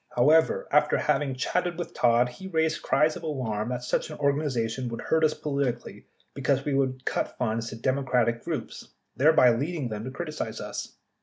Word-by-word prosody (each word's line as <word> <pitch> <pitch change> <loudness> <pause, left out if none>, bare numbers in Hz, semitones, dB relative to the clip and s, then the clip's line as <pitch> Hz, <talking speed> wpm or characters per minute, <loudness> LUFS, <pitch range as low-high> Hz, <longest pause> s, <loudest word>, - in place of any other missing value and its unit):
However, 155 +6 +4
after 150 +1 +4
having 140 -2 0
chatted 175 +6 -1
with 175 - -5
Todd, 120 0 +3
he 155 +10 -9
raised 160 -3 0
cries 155 +2 +2
of - - -7
alarm 125 -9 -3
that 125 0 -3
such 125 - -1
an 155 - -7
organization 130 -4 0
would 115 - -5
hurt 160 0 +1
us 155 -1 +3
politically 140 -5 -3 0.3
be 140 - -7
cause 135 +1 +1
we 145 - 0
would 130 -1 0
cut - - -2
funds 115 -1 -1
to - - -7
Democratic 125 -1 0
groups, - - -6 0.2
thereby 135 -4 +5
leading 140 +2 -2
them 105 -1 -5
to - - -4
criticize 155 +3 -5
us. - - -6
135 Hz, 180 wpm, -27 LUFS, 120-155 Hz, 0.3 s, thereby